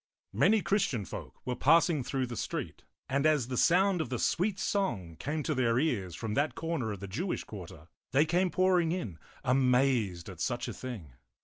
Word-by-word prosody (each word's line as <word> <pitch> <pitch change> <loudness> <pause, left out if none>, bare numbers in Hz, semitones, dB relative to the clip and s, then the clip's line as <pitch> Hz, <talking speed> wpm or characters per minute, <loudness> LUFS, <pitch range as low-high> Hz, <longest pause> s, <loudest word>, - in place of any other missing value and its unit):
Many 215 0 +4
Christian 190 - +1
folk - - -9
were 125 - -1
passing 160 +1 +4
through 130 +1 -1
the 120 -1 -6
street, - - -4 0.3
and 140 +1 0
as 145 -6 +2
the 130 - -2
sound 180 +5 +4
of 135 - -4
the 125 - -2
sweet 185 - +1
song 105 - -1
came 150 +2 -2
to - - 0
their 115 -2 +2
ears 105 - 0
from 110 +3 -4
that 145 +7 0
corner 160 -9 -2
of 100 -2 -6
the 100 - -5
Jewish 170 - -3
quarter, 90 -6 -10 0.2
they 145 +4 +4
came 180 +3 +2
pouring 180 -2 +2
in, 110 - -4 0.2
amazed 125 -8 +2
at 90 -4 -8
such 120 -1 -1
a - - -4
thing. 105 - -7
130 Hz, 190 wpm, -30 LUFS, 110-170 Hz, 0.3 s, Many